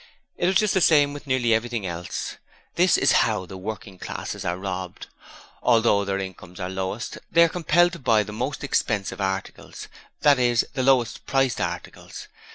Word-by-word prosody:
It 175 - 0
was 190 - +1
just 210 +1 +3
the 190 - +2
same 145 -3 +4
with 145 0 -10
nearly 125 -3 +2
everything 115 -2 -1
else. 85 0 -5 0.4
This - - +4
is - - +3
how 90 - 0
the 95 - -10
working 95 -1 -7
classes 105 +2 -6
are 90 -1 -2
robbed. 95 -1 -5 0.6
Although 115 -4 +3
their 100 0 -1
incomes 95 -1 -8
are 90 -1 -3
the - - -6
lowest, 95 +4 -4
they 170 - +6
are - - +5
compelled 175 +1 +2
to 170 - -8
buy 115 -5 +3
the 105 - -9
most 135 +7 -3
expensive 105 -7 -1
articles 95 0 -5 0.3
that 145 -3 +5
is, 120 -2 +2
the 135 - -1
lowest 125 -3 +1
priced 135 -3 +1
articles. - - -6
115 Hz, 180 wpm, -24 LUFS, 95-140 Hz, 0.6 s, they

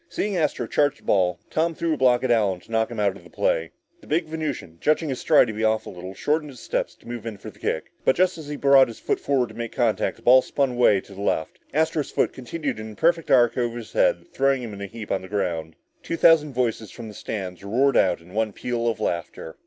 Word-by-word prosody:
Seeing 205 -1 -2
Astro 150 -7 0
charge 145 +4 +1
the - - -23
ball, 90 -3 +2
Tom 165 +1 0
threw 165 0 0
a - - -2
block 125 -2 +3
on 130 - +1
Allen 100 -6 +2
to - - -18
knock 110 0 +1
him 120 -2 -6
out 100 -2 +1
of - - -14
the - - -15
play. - - 0 0.3
The - - -18
big 160 +2 +1
Venusian, 155 - -5
judging 155 +1 +2
his 130 - -3
stride 155 - +5
to 110 - -5
be 110 - -5
a 110 0 +4
little 95 -4 -5
off, 95 - -11
shortened 150 +3 0
his 130 -4 -12
steps - - -2
to - - -20
move 120 -2 -6
in 110 -3 -5
for - - -9
the - - -23
kick. - - -2
But - - +3
just 185 0 +2
as 155 - -9
he 150 - -4
brought 140 -1 +6
his 115 - -9
foot - - -1
forward 130 -4 0
to - - -12
make 115 -1 -5
contact, 115 -4 +1
the - - -21
ball 130 +1 +7
spun 140 -1 0
away 120 -5 +4
to 100 - -15
the 100 - -8
left. 80 -5 -1
Astro's 160 0 0
foot - - 0
continued 140 0 -4
in 110 0 -7
a - - -15
perfect 165 +3 +1
arc 120 -1 +4
over 120 -1 -1
his 120 - -9
head, - - +2
throwing 135 -2 +2
him 115 -3 -6
in 100 - -8
a 100 - -4
heap 110 +1 -8
on 95 - 0
the 95 - -9
ground. 85 -6 -2 0.3
Two 165 - -4
thousand 155 -4 +5
voices 115 -4 -1
from 115 -2 -9
the 105 - -9
stands 95 -3 -6
roared 130 +7 +2
in 90 -1 +1
one 110 -1 0
peal 120 +1 -2
of 115 -2 -1
laughter. 85 -4 -4
120 Hz, 260 wpm, -24 LUFS, 105-145 Hz, 0.3 s, ball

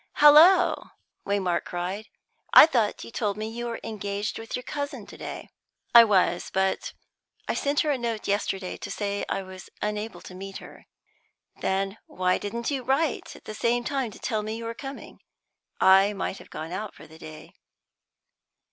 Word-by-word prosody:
"Halloa!" 330 +5 +6 0.3
Waymark 195 -3 0
cried. 185 +5 -4 0.5
"I - - +12
thought 235 -10 0
you - - -10
told 210 -3 -2
me 215 0 -3
you 240 +2 -5
were 230 - -4
engaged 205 0 -4
with 225 +1 -5
your 250 - -5
cousin 285 -5 -5
to - - -12
day." - - -7 0.4
"I 235 -1 +10
was, 185 -4 +2
but 190 0 0 0.5
I - - 0
sent 285 +1 +1
her 305 - +1
a 270 - -1
note 230 -2 -3
yesterday 195 -2 -1
to - - -7
say 205 -1 -2
I 195 - -1
was 185 -1 -11
unable 210 -3 -3
to - - -11
meet 195 +1 -7
her." - - -13 0.7
"Then 195 +2 -1
why 185 0 0
didn't 235 +5 -3
you 275 -2 -1
write 270 +4 -1
at - - -16
the 215 - -6
same 235 +3 0
time 270 0 -1
and 220 - -9
tell 220 -4 0
me 215 +1 -4
you 230 - -7
were 230 - -3
coming? 270 +3 -9 0.6
I 195 +2 +6
might 195 -1 -4
have - - -15
gone 160 +2 -7
out 210 +3 -5
for - - -13
the 160 +1 -15
day." 155 -1 -11
210 Hz, 180 wpm, -26 LUFS, 195-240 Hz, 0.7 s, I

